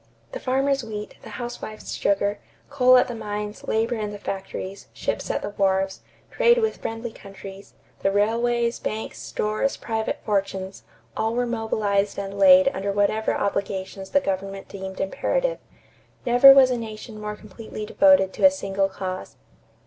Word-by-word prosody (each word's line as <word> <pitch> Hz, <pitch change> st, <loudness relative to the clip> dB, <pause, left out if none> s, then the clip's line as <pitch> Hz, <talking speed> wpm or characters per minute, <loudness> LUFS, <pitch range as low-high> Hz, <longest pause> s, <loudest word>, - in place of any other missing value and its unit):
The -, -, -5 dB
farmer's 270 Hz, +1 st, +1 dB
wheat, 210 Hz, -2 st, -6 dB
the -, -, -11 dB
housewife's 240 Hz, -3 st, -6 dB
sugar, 200 Hz, +1 st, 0 dB, 0.3 s
coal 255 Hz, -2 st, +6 dB
at 250 Hz, -, +4 dB
the 245 Hz, -, -5 dB
mines, 210 Hz, -1 st, -5 dB
labor 225 Hz, +2 st, +1 dB
in 215 Hz, -3 st, -3 dB
the 205 Hz, -, -7 dB
factories, 195 Hz, 0 st, -6 dB
ships -, -, -3 dB
at -, -, -1 dB
the 205 Hz, -, -4 dB
wharves, 195 Hz, -1 st, 0 dB, 0.3 s
trade 475 Hz, -1 st, +4 dB
with 445 Hz, -2 st, 0 dB
friendly 225 Hz, +1 st, -5 dB
countries, 195 Hz, -1 st, -12 dB, 0.2 s
the -, -, +1 dB
railways, 235 Hz, +3 st, +1 dB
banks, 220 Hz, +1 st, -4 dB
stores, 215 Hz, +6 st, -1 dB
private 220 Hz, -1 st, -2 dB
fortunes 195 Hz, -2 st, -2 dB, 0.3 s
all 225 Hz, +1 st, -1 dB
were 245 Hz, 0 st, +1 dB
mobilized 215 Hz, -4 st, 0 dB
and 200 Hz, 0 st, -5 dB
laid 280 Hz, -1 st, +7 dB
under 200 Hz, -6 st, -3 dB
whatever 205 Hz, +2 st, +1 dB
obligations 195 Hz, -1 st, -3 dB
the 285 Hz, -, +4 dB
government 195 Hz, -2 st, -3 dB
deemed 190 Hz, -1 st, -7 dB
imperative. -, -, -1 dB, 0.7 s
Never 245 Hz, +3 st, +9 dB
was 270 Hz, -2 st, +7 dB
a 250 Hz, -, 0 dB
nation 220 Hz, -1 st, -8 dB
more 210 Hz, 0 st, -4 dB
completely 215 Hz, +1 st, -8 dB
devoted 280 Hz, -6 st, +4 dB
to -, -, -6 dB
a 285 Hz, -, +10 dB
single 195 Hz, -8 st, -1 dB
cause. 185 Hz, -1 st, -6 dB
215 Hz, 155 wpm, -24 LUFS, 195-245 Hz, 0.7 s, a